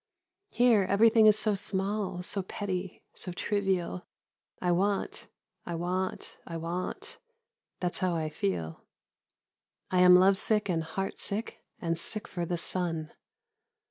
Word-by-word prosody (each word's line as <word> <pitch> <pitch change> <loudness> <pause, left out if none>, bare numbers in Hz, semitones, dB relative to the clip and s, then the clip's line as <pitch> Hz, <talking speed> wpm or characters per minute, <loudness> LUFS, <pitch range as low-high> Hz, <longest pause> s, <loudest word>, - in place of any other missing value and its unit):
Here 240 -4 +4
everything 220 +2 +6
is 210 0 +6
so 215 0 +1
small, 195 -1 -2
so 195 +2 -3
petty, 185 -1 -4
so 180 - -3
trivial. 190 -2 -1 0.5
I 180 - +1
want, 195 +3 0 0.4
I 170 - -4
want, 180 +2 -3
I 165 - -4
want, 170 +3 -5 0.6
that's 180 -1 -2
how 180 -2 +1
I 160 -1 -1
feel; 85 - -3 1.1
I 185 - +3
am 180 0 +9
lovesick 195 +3 +4
and 165 -2 +1
heartsick 195 +6 -4 0.2
and 165 -1 -1
sick 215 +4 -4
for 175 -2 -4
the 175 - -1
sun. 165 -2 -2
185 Hz, 125 wpm, -30 LUFS, 175-205 Hz, 1.1 s, am